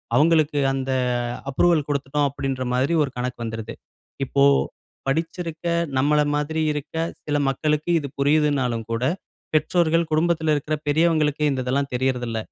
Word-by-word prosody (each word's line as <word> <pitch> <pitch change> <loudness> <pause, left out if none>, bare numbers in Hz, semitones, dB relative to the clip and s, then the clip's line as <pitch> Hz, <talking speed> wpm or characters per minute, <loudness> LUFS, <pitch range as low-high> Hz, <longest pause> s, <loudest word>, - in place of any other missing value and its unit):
அவுங்களுக்கு 155 +1 +3
அந்த 135 0 -2 0.6
அப்ரூவல் 155 +1 +2
கொடுத்துட்டோம். 145 +1 0
அப்பிடின்ற 135 -1 -3
மாரி, 135 +6 +1
ஒரு 135 - -3
கணக்கு 125 0 -3
வந்துருது. 115 0 -5 0.5
இப்போ 140 +1 +1 0.6
படிச்சிருக்க, 165 +3 -3 0.3
நம்மள 150 +2 +3
மாதிரி 150 +2 -1
இருக்க 150 +1 -6 0.3
சில 145 -1 0
மக்களுக்கு 150 +3 0
இது 140 - -5
புரியுதுனாலும் 140 -5 +2
கூட, 115 +1 -2 0.5
பெற்றோர்கள் 165 +1 +2
குடும்பத்தில 160 0 +2
இருக்கிற 150 +1 -1
பெரியவங்களுக்கு, 155 -1 +2
இந்த 130 -2 -1
இதெல்லாம் 135 +2 -1
தெரியறதில்ல. 125 -3 -1
145 Hz, 125 wpm, -23 LUFS, 130-155 Hz, 0.6 s, அவுங்களுக்கு